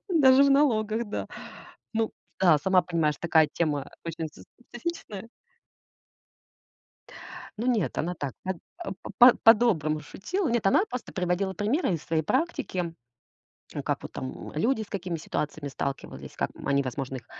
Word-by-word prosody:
Даже 275 -6 +6
в 280 - +4
налогах, 235 -5 +3
да. 205 - -4 0.7
Ну 225 0 0 0.3
да, 170 -5 +6
сама 185 +4 +3
понимаешь, 165 -4 0
такая 160 -2 +4
тема, 150 -4 0
а, - - -15
очень 165 -1 -4
со - - -14 0.2
специфичная. 240 - -6 2.3
Ну, 235 - -2
нет, 225 -8 +1
она 175 +3 -1
так 145 -5 -4
кат 190 -1 -2 0.2
а, 350 - -5
по - - -7 0.2
по - - -4
по-доброму 205 -10 +5
шутила. 330 - -3
Нет, 235 -4 +1
она 195 - +5
просто 250 - -6
приводила 185 +1 0
примеры 210 - 0
из 160 - -4
своей 160 -1 0
практики. 260 - -1 1.0
М, - - -3
как - - -2
вот - - -8
там, 130 - -6
м, - - -9
люди, 225 - +1
с 210 - -9
какими 185 -4 -3
ситуациями 150 -1 -4
сталкивались, 140 0 -5
как, - - -1
м, - - -11
они, 140 0 +3
возможно, 135 0 -4
их 120 - -9
190 Hz, 160 wpm, -27 LUFS, 155-235 Hz, 2.3 s, Даже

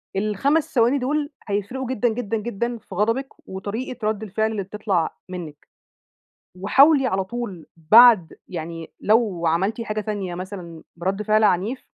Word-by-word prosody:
ال5 215 - 0
ثواني 245 +2 +3
دول 290 +3 -1 0.2
هيفرقوا 205 +6 -3
جدًا، 245 -2 +1
جدًا، 225 -1 -2
جدًا 235 +2 -3
في 200 -3 -12
غضبِك 230 +7 +1 0.2
وطريقة 215 +5 -4
رد 215 0 -1
الفعل 220 +2 -1
اللي 210 -3 -3
بتطلع 195 -4 -2
منِك، 165 -5 -8 0.9
وحاولي 275 +7 +5
على 190 -4 0
طول 200 -6 -6
بعد 205 +2 +6
يعني 165 -1 -6
لو 210 -6 +2
عملتِ 195 +8 0
حاجة 215 -1 -3
تانية 205 -4 -4
مثلًا 180 -3 -8
برد 190 +4 -2
فعل 215 +1 +3
عنيف، 210 +6 +1
210 Hz, 140 wpm, -23 LUFS, 185-235 Hz, 0.9 s, بعد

